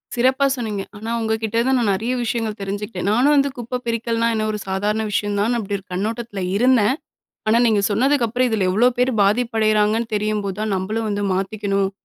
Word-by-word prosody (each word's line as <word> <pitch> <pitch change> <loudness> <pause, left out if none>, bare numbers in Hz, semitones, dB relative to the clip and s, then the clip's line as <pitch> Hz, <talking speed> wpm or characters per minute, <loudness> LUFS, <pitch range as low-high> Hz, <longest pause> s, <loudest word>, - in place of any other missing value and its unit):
சிறப்பா 260 +3 +3
சொன்னீங்க, 220 -5 -3 0.2
ஆனா 220 +2 -5
உங்க 220 0 0
கிட்ட 225 +1 +1
நான் 250 -5 +2
நிறைய 220 +6 -2
விஷயங்கள் 225 -2 -2
தெரிஞ்சுக்கிட்டேன், 195 -1 -4
நானும் 255 +7 +4
வந்து 280 0 +3
குப்ப 245 +1 -4
பிரிக்கல்னா 230 0 0
என்ன 215 -1 0
ஒரு 210 - -4
சாதாரண 205 +3 -1
விஷயந்தான் 205 +3 0
அப்டி 205 -3 -3
ஒரு 195 - -13
கண்ணோட்டத்துல 215 +2 -3 0.2
இருந்தேன். 250 0 +4 0.5
ஆனா 220 +2 +4
நீங்க 215 -3 +3
சொன்னதுக்கப்பறம், 250 +1 +2
இதில 210 -5 +1
எவ்ளோ 230 +6 +4
பேர் 250 +1 +3
பாதிப்படையறாங்கன்னு 220 0 +1
தெரியும்போதுதான் 210 0 -1
நம்மளும் 215 +4 -2
வந்து 205 0 -2
மாத்திக்கணும், 195 0 -1
220 Hz, 160 wpm, -21 LUFS, 205-235 Hz, 0.5 s, நானும்